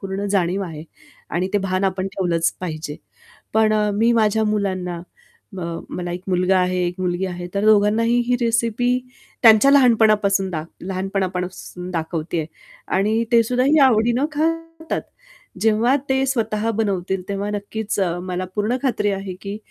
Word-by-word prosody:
पूर्ण 195 +1 -4
जाणीव 190 0 +1
आहे. 155 -3 -7 0.5
आणि 180 +2 -1
ते 205 - +3
भान 185 +1 0
आपण 190 0 -1
ठेवलंच 170 -3 0
पाहिजे. 155 -4 -5 0.6
पण 220 -1 +4 0.3
मी 230 +2 +4
माझ्या 220 -1 +2
मुलांना 185 -4 -1 0.6
म 180 - -4 0.3
मला 175 -1 -4
1 180 +1 -6
मुलगा 185 +1 +2
आहे, 180 0 +1
1 175 - -3
मुलगी 180 +1 -1
आहे, 175 -1 -5
तर 200 - 0
दोघांनाही 215 +3 +4
ही 250 0 +2
रेसिपी 230 +1 +1 0.5
त्यांच्या 225 +3 +7
लहानपणापासून 215 -7 +4
दाख 160 -2 -4 0.2
लहानपणापासून 185 -1 -4
दाखवते 165 0 -3
आहे 155 - -2 0.5
आणि 215 +4 +1
ते 230 -1 +6
सुद्धा 250 +2 0
ही 300 +3 +4
आवडीनं 240 0 +4
खातात. 330 +1 -2 0.6
जेव्हा 225 +4 +3
ते 265 0 +2
स्वतः 225 -4 0
बनवतील 190 -3 -1
तेव्हा 200 +1 -2
नक्कीच, 210 +1 -4 0.2
मला 185 0 -3
पूर्ण 215 +4 0
खात्री 235 -6 +1
आहे 195 -1 -4
की 200 +1 -5
200 Hz, 145 wpm, -21 LUFS, 185-225 Hz, 0.6 s, त्यांच्या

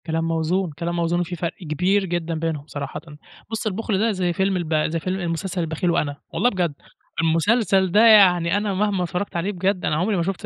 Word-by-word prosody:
كلام 165 -1 -1
موزون، 165 +2 0
كلام 170 +3 -4
موزون، 170 0 0
وفي 175 0 -3
فرق 170 0 -3 0.2
كبير 190 +5 +2
جدًا 170 -2 -2
بينهم 155 -2 -3
صراحةً. 145 -1 -6 0.5
بُص، 220 0 -2
البُخل 210 -1 -1
ده 225 +2 +2
زي 180 -3 -1
فيلم 190 +2 0
الب 165 -3 -2
زي 165 +1 -2
فيلم 185 0 -2
مسلسل 180 +2 -3
البخيل 165 +2 -1
وأنا، 145 -3 -1
والله 245 - +2
بجد. 180 -8 -1 0.5
المسلسل 190 +3 +2
ده 215 +5 +5
يعني 180 -4 +6
أنا 205 -1 -1
مهما 195 -1 0
اتفرّجت 180 +3 -4
عليه 170 +4 -1
بجد 190 0 -1
أنا - - +1
عمري 190 +7 0
ما 170 - +1
شُفتش 190 +1 -4
180 Hz, 200 wpm, -22 LUFS, 165-195 Hz, 0.5 s, يعني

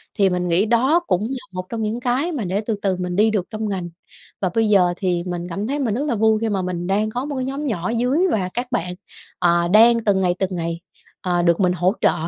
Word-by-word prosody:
thì 200 -3 +3
mình 180 -1 -1
nghĩ 180 +5 +3
đó 255 +9 +3
cũng 180 +3 +1
là 265 - -3
một 185 0 -4
trong 225 -2 -3
những 220 +3 -2
cái 260 +8 0
mà 250 - -3
để 195 +4 -1
từ 220 0 -2
từ 190 -2 +1
mình 180 -1 -3
đi 215 +3 +4
được 195 -4 -1
trong 215 -1 -3
ngành. 180 -3 -3 0.5
Và 185 - +1
bây 225 -1 +2
giờ 180 -4 +4
thì 175 -3 -1
mình 175 0 -4
cảm 200 +6 -3
thấy 285 +2 -2
mình 235 -7 0
rất 285 +4 -1
là 260 - 0
vui 220 0 +3
khi 225 - 0
mà 195 -2 0
mình 180 -1 -3
đang 210 +3 +1
có 245 +4 -3
một 290 -1 -4
cái 255 0 -2
nhóm 280 +2 -3
nhỏ 185 -6 -2
ở - - -1
dưới, 250 +6 +1
và 185 -4 0
các 245 +1 -2
bạn, 180 -6 -2 0.4
ờ, 170 -1 +3
đang 230 +4 +5
từng 195 -2 +3
ngày, 180 -1 +1
từng 190 -1 -1
ngày, 170 0 -3 0.4
ờ, 175 -2 0
được 170 +1 +3
mình 180 -2 +3
hỗ 180 +3 +1
trợ. - - +4
200 Hz, 270 wpm, -21 LUFS, 180-235 Hz, 0.5 s, đang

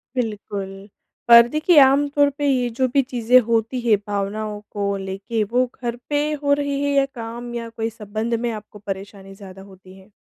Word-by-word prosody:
बिल्कुल 205 -5 -4 0.6
और 235 0 +9
देखिए 310 +3 +2
आम 275 +2 +5
तौर 285 -1 +4
पे 290 - -2
ये 250 -3 +1
जो 260 - +3
भी 280 - +4
चीज़ें 250 -1 +3
होती 230 +2 0
हैं, 225 -3 +3
भावनाओं 205 +1 -3
को 200 -1 -2
लेके, 195 +4 -3
वो 245 +5 +1 0.2
घर 235 -1 -2
पे 290 0 +1 0.2
हो 285 - +3
रही 285 -1 -1
है 285 - 0
या 275 -1 +4
काम 235 +1 -7
या 230 -1 -5
कोई 225 0 -3
संबंध 220 +1 -4
में 240 0 -2
आपको 210 -1 -9
परेशानी 195 0 -8
ज़्यादा 190 -1 -12
होती 190 -1 -15
है? 195 +3 -20
225 Hz, 185 wpm, -21 LUFS, 205-255 Hz, 0.6 s, और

